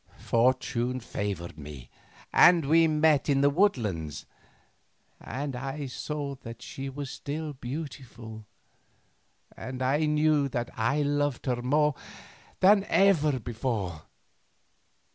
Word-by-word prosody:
Fortune 125 Hz, +1 st, +1 dB
favoured 100 Hz, -8 st, -5 dB
me, 70 Hz, -4 st, -10 dB, 0.4 s
and 170 Hz, -4 st, +6 dB
we 165 Hz, +3 st, +5 dB
met 155 Hz, -1 st, +3 dB
in 135 Hz, -1 st, +3 dB
the 145 Hz, 0 st, +4 dB
woodland, 105 Hz, -, 0 dB, 0.9 s
and 135 Hz, +2 st, -5 dB
I 135 Hz, +3 st, -4 dB
saw 140 Hz, +2 st, -4 dB
that 115 Hz, +1 st, -9 dB
she 135 Hz, 0 st, -6 dB
was 140 Hz, 0 st, -6 dB
still 150 Hz, +1 st, -5 dB
beautiful 120 Hz, -5 st, -8 dB, 1.1 s
and 130 Hz, 0 st, -7 dB, 0.4 s
knew 150 Hz, -2 st, +3 dB
that 120 Hz, -2 st, -3 dB
I 115 Hz, +7 st, +1 dB
loved 145 Hz, -2 st, -1 dB
her 125 Hz, -2 st, -1 dB
more 150 Hz, +4 st, +2 dB, 0.7 s
than 195 Hz, +1 st, +6 dB
ever 155 Hz, -11 st, +3 dB
before. 110 Hz, -, -3 dB
135 Hz, 105 wpm, -28 LUFS, 115-150 Hz, 1.1 s, and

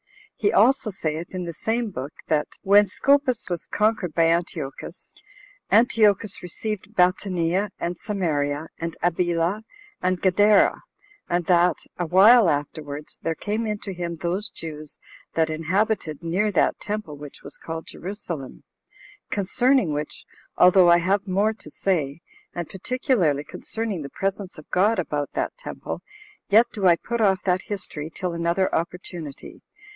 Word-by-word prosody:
He 205 Hz, -, +1 dB
also 245 Hz, +3 st, +4 dB
saith, 165 Hz, -2 st, -4 dB
in 180 Hz, -, -3 dB
the 170 Hz, -1 st, -5 dB
same 225 Hz, +6 st, -2 dB
book, 135 Hz, -2 st, -5 dB, 0.2 s
that 150 Hz, -1 st, +1 dB, 0.2 s
"when 205 Hz, +1 st, +6 dB
Seopas 275 Hz, -2 st, +2 dB
was 175 Hz, -2 st, -4 dB
conquered 210 Hz, -6 st, 0 dB
by 165 Hz, -, +4 dB
Antiochus, 165 Hz, -5 st, -3 dB, 0.6 s
Antiochus 215 Hz, -4 st, +3 dB
received 210 Hz, +4 st, -5 dB
Batanea, 180 Hz, +1 st, +1 dB
and 175 Hz, +1 st, -2 dB
Samaria, 160 Hz, -7 st, -2 dB
and 165 Hz, 0 st, -4 dB
Abila, 175 Hz, +3 st, +1 dB, 0.4 s
and 185 Hz, 0 st, 0 dB
Gadara; 205 Hz, +2 st, +4 dB, 0.5 s
and 175 Hz, 0 st, 0 dB
that, 175 Hz, 0 st, +4 dB, 0.2 s
a 175 Hz, -, -1 dB
while 200 Hz, +4 st, +7 dB
afterwards, 145 Hz, 0 st, -4 dB
there 165 Hz, 0 st, -1 dB
came 215 Hz, +6 st, -2 dB
in 210 Hz, -1 st, -1 dB
to 195 Hz, -, -5 dB
him 175 Hz, -1 st, -4 dB
those 175 Hz, +6 st, -2 dB
Jews 155 Hz, -2 st, -8 dB, 0.4 s
that 160 Hz, -1 st, +2 dB
inhabited 170 Hz, 0 st, -1 dB
near 190 Hz, +6 st, 0 dB
that 190 Hz, -, +2 dB
temple 210 Hz, -7 st, -4 dB
which 145 Hz, -1 st, -11 dB
was 140 Hz, -, -7 dB
called 165 Hz, 0 st, -6 dB
Jerusalem; 170 Hz, -7 st, -6 dB, 0.7 s
concerning 230 Hz, -, +2 dB
which, 150 Hz, +1 st, -5 dB, 0.3 s
although 180 Hz, 0 st, +7 dB
I 170 Hz, -, +7 dB
have 195 Hz, +4 st, 0 dB
more 200 Hz, +4 st, +2 dB
to 210 Hz, -, -13 dB
say, 155 Hz, -4 st, -1 dB, 0.3 s
and 175 Hz, -2 st, -3 dB
particularly 190 Hz, -, 0 dB
concerning 215 Hz, +3 st, -4 dB
the 140 Hz, -, -6 dB
presence 195 Hz, +3 st, -3 dB
of 155 Hz, -, -12 dB
God 210 Hz, +5 st, +3 dB
about 150 Hz, -5 st, -2 dB
that -, -, -2 dB
temple, -, -, -6 dB, 0.5 s
yet 220 Hz, +4 st, +6 dB
do 195 Hz, -3 st, +1 dB
I 170 Hz, -, +7 dB
put 235 Hz, +6 st, -3 dB
off 195 Hz, -3 st, +3 dB
that 185 Hz, -1 st, +1 dB
history 170 Hz, -7 st, -4 dB
till 180 Hz, +1 st, -3 dB
another 170 Hz, +3 st, 0 dB
opportunity." 170 Hz, -3 st, -5 dB
180 Hz, 145 wpm, -24 LUFS, 165-205 Hz, 0.7 s, while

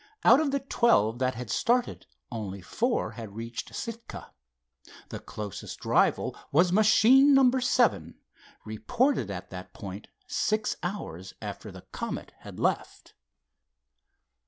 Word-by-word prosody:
Out 245 Hz, +5 st, +7 dB
of 310 Hz, -2 st, +1 dB
the 275 Hz, 0 st, -1 dB
twelve 120 Hz, -, +2 dB
that 130 Hz, 0 st, 0 dB
had 120 Hz, -1 st, -6 dB
started 245 Hz, +1 st, 0 dB, 0.2 s
only 105 Hz, -4 st, -5 dB
four 235 Hz, -, -1 dB
had 110 Hz, -3 st, -9 dB
reached 115 Hz, +1 st, -6 dB
Sitka. 230 Hz, 0 st, -7 dB, 0.8 s
The -, -, -6 dB
closest 105 Hz, -3 st, -8 dB
rival -, -, +2 dB, 0.2 s
was 175 Hz, +5 st, +4 dB
machine 235 Hz, +7 st, +6 dB
number 260 Hz, -1 st, +4 dB
seven, 230 Hz, -, +1 dB, 0.5 s
reported 230 Hz, -, 0 dB
at 90 Hz, -2 st, -7 dB
that 90 Hz, 0 st, -9 dB
point 100 Hz, +1 st, -8 dB, 0.2 s
six 250 Hz, -6 st, 0 dB
hours 95 Hz, -, -6 dB
after 105 Hz, 0 st, -7 dB
the 95 Hz, -1 st, -13 dB
Comet -, -, -5 dB
had -, -, -11 dB
left. -, -, -2 dB
140 Hz, 125 wpm, -28 LUFS, -, 0.8 s, Out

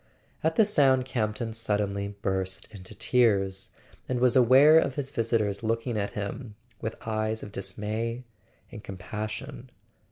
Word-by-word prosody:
At 160 Hz, +1 st, +1 dB
the 220 Hz, -, +5 dB
sound 135 Hz, -10 st, +4 dB
Campton 115 Hz, -2 st, -2 dB
suddenly 105 Hz, -2 st, -1 dB, 0.2 s
burst 95 Hz, 0 st, -2 dB
into 100 Hz, 0 st, -10 dB
tears, 100 Hz, -4 st, +1 dB, 0.4 s
and 125 Hz, -1 st, 0 dB
was 125 Hz, -1 st, +3 dB
aware 135 Hz, +5 st, +7 dB
of 135 Hz, -, -1 dB
his 140 Hz, -2 st, -4 dB
visitor's 110 Hz, -5 st, 0 dB
looking 115 Hz, +1 st, -1 dB
at 100 Hz, -1 st, -2 dB
him 105 Hz, +2 st, -5 dB, 0.3 s
with 110 Hz, 0 st, -3 dB
eyes 110 Hz, 0 st, -2 dB
of 105 Hz, -, -8 dB
dismay 110 Hz, +5 st, -3 dB, 0.5 s
and 105 Hz, -, -9 dB
compassion. 110 Hz, +8 st, -6 dB
110 Hz, 135 wpm, -27 LUFS, 105-125 Hz, 0.5 s, aware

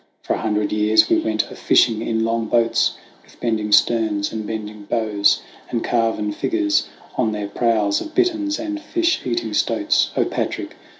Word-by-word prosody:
for -, -, -1 dB
a -, -, -2 dB
hundred 105 Hz, -1 st, 0 dB
years 105 Hz, +1 st, +3 dB
We -, -, +4 dB
went 110 Hz, -1 st, -1 dB
a -, -, -8 dB
fishing 110 Hz, -2 st, +3 dB
in 110 Hz, -1 st, -1 dB
long 115 Hz, 0 st, -1 dB
boats 115 Hz, 0 st, +2 dB, 0.3 s
With -, -, -22 dB
bending 110 Hz, -3 st, -1 dB
sterns 105 Hz, -1 st, +2 dB
and 110 Hz, -1 st, -4 dB
bending 105 Hz, -1 st, -6 dB
bows, 105 Hz, -2 st, +1 dB, 0.3 s
And 115 Hz, -, -2 dB
carven 115 Hz, -3 st, 0 dB
figures 315 Hz, -, 0 dB, 0.3 s
on 110 Hz, -4 st, +1 dB
their 105 Hz, -1 st, -3 dB
prows 105 Hz, -2 st, +1 dB
Of 315 Hz, -, -8 dB
bitterns 320 Hz, -5 st, +1 dB
and 310 Hz, 0 st, -4 dB
fish 335 Hz, 0 st, 0 dB
eating 345 Hz, -, -2 dB
stoats. -, -, +1 dB, 0.2 s
Patric! -, -, -3 dB
110 Hz, 165 wpm, -21 LUFS, 105-125 Hz, 0.3 s, We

